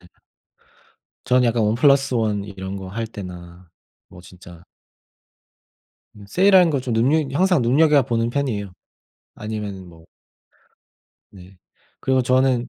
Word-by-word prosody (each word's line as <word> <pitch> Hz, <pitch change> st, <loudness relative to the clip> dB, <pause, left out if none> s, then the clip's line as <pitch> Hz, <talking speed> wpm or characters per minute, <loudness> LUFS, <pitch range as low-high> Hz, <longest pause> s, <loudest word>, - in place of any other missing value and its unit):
네. 90 Hz, -, -20 dB, 1.2 s
저는 125 Hz, 0 st, +2 dB
약간 115 Hz, -1 st, +1 dB
1+1 115 Hz, -3 st, +1 dB
이런 95 Hz, -1 st, -7 dB
거 95 Hz, -1 st, -8 dB
할 115 Hz, +4 st, -4 dB
때나 90 Hz, -4 st, -11 dB, 0.4 s
뭐 90 Hz, -, -14 dB
진짜 90 Hz, -1 st, -15 dB, 1.5 s
그냥 100 Hz, -1 st, -15 dB
세일하는 185 Hz, -, +4 dB
걸 140 Hz, -3 st, -1 dB
좀 125 Hz, -1 st, -4 dB
눈여 130 Hz, +8 st, +2 dB, 0.2 s
항상 180 Hz, -5 st, +2 dB
눈여겨보는 130 Hz, -3 st, +2 dB
편이에요. 115 Hz, -8 st, -3 dB, 0.6 s
아니면은 105 Hz, -3 st, -6 dB
뭐 85 Hz, -1 st, -17 dB, 1.2 s
네. 95 Hz, 0 st, -16 dB, 0.4 s
그리고 130 Hz, -1 st, +1 dB
저는 130 Hz, -1 st, +1 dB
115 Hz, 220 characters per minute, -21 LUFS, 95-130 Hz, 1.5 s, 세일하는